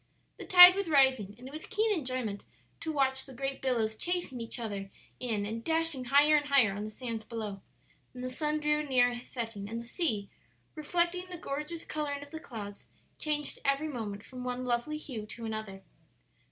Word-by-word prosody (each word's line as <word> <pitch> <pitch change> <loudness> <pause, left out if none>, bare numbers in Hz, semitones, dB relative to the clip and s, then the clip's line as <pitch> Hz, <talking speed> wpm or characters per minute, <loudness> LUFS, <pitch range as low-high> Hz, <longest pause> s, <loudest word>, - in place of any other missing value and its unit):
The - - -8
tide 360 0 +11
was 390 -2 -2
rising, 265 -9 +4
and 250 +2 -10
it 270 - -11
was 310 - -7
keen 440 0 +2
enjoyment 255 - -3 0.3
to 320 - -3
watch 265 -3 +2
the 265 - -10
great 270 +1 -3
billows 230 -4 0
chasing 345 -4 -2
each 230 - -3
other 200 -4 -4 0.3
in 220 -5 -1
and 225 +2 -4
dashing 320 -4 0
higher 290 +4 +6
and 290 -1 +2
higher 255 -9 +5
on 205 +1 -4
the - - -5
sands 230 -1 -5
below. 215 -4 -5 0.5
Then 250 0 -8
the 255 - -2
sun 300 +3 -1
drew 300 0 +2
near 250 -4 +3
his 240 0 -8
setting, 225 -5 -5
and 230 +1 -3
the 235 - -8
sea, 230 - -1 0.5
reflecting 345 +4 0
the 360 - -6
gorgeous 300 +3 -5
coloring 285 -2 -3
of 285 - -14
the 320 - -6
clouds, 210 -10 -8 0.3
changed 295 -1 -1
every 275 +3 +1
moment 215 -6 -5
from 255 -1 -9
one 250 0 -3
lovely 245 +5 -1
hue 235 -8 -6
to 230 +2 -7
another. 215 -3 -5
260 Hz, 195 wpm, -31 LUFS, 225-300 Hz, 0.5 s, tide